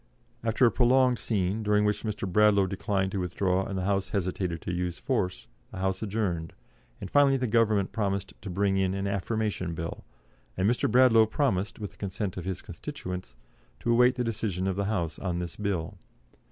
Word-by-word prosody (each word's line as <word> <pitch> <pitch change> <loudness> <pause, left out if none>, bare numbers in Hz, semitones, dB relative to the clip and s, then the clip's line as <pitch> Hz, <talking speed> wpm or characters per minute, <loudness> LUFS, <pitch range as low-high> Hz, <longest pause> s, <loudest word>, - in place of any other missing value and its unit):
After 115 +3 +3
a 115 - +5
prolonged 125 0 +3
scene, 100 0 -1
during 105 0 +2
which 105 0 +1
Mr. 105 -3 -3
Bradlaugh 100 +1 +4
declined 95 0 -1
to 100 - -2
withdraw 90 +1 0
and 100 - -4
the 95 - -1
House 100 -1 0
hesitated 90 -3 -2
to 90 - -3
use 90 -1 -2
force, 100 -9 -2 0.2
the - - -10
House 95 0 -1
adjourned, 95 -7 -2 0.5
and 95 - -7
finally 140 -1 +5
the 130 - -1
Government 110 -4 +2
promised 100 -2 -2
to 100 - -6
bring 95 +1 +1
in 95 0 +1
an 100 0 -2
Affirmation 100 -3 -2
Bill, 85 +1 -5 0.5
and 95 +2 +2
Mr. 120 +1 +2
Bradlaugh 115 -2 +6
promised, 105 -6 0
with 105 -3 -6
the - - -23
consent 100 -1 -3
of 90 - -6
his 95 -2 -4
constituents, 90 -9 -7 0.5
to 120 - 0
await 125 +2 +5
the 125 - -1
decision 105 -5 -2
of 95 -1 0
the 100 +1 -1
House 85 -7 -2
on 90 -3 -2
this 85 -1 -4
Bill. 100 -2 -3
100 Hz, 190 wpm, -28 LUFS, 90-110 Hz, 0.5 s, Bradlaugh